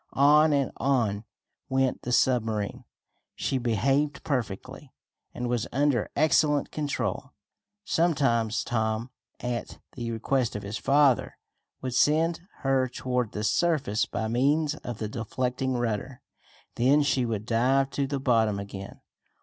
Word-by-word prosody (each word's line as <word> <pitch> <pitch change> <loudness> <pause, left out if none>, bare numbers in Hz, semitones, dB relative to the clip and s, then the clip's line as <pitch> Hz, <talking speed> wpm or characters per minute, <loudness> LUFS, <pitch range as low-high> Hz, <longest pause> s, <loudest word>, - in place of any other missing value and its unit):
On 150 +3 +5
and 140 -2 +1
on 115 -6 0 0.4
went 130 -1 +1
the 125 - -4
submarine. 120 -1 +1 0.5
She 135 - -1
behaved 135 +5 0
perfectly, 130 0 -4 0.4
and 125 - -4
was 120 -2 -1
under 140 -4 +1
excellent 150 -1 +2
control. 145 -2 -3 0.5
Some 170 -4 +1
times 115 -6 +1
Tom, 110 +1 -1 0.3
at 125 -1 -4 0.2
the 120 -2 -5
request 115 +1 -1
of 105 - -4
his 100 +2 -5
father, 140 -2 +3 0.5
would 130 -1 -3
send 160 +6 +2 0.2
her 135 -1 +2
toward 125 -2 -2
the 105 - -3
surface 125 -5 +1
by 110 - -3
means 145 +6 +2
of 120 -7 -7
the 110 - -3
deflecting 125 +3 -2
rudder. 120 +1 -3 0.5
Then 135 +5 +4
she 135 -2 +1
would 110 -3 -2
dive 130 +4 +2
to 140 -1 -1
the 140 0 -2
bottom 115 -6 +2
again. 100 -1 -8
125 Hz, 135 wpm, -27 LUFS, 115-140 Hz, 0.5 s, On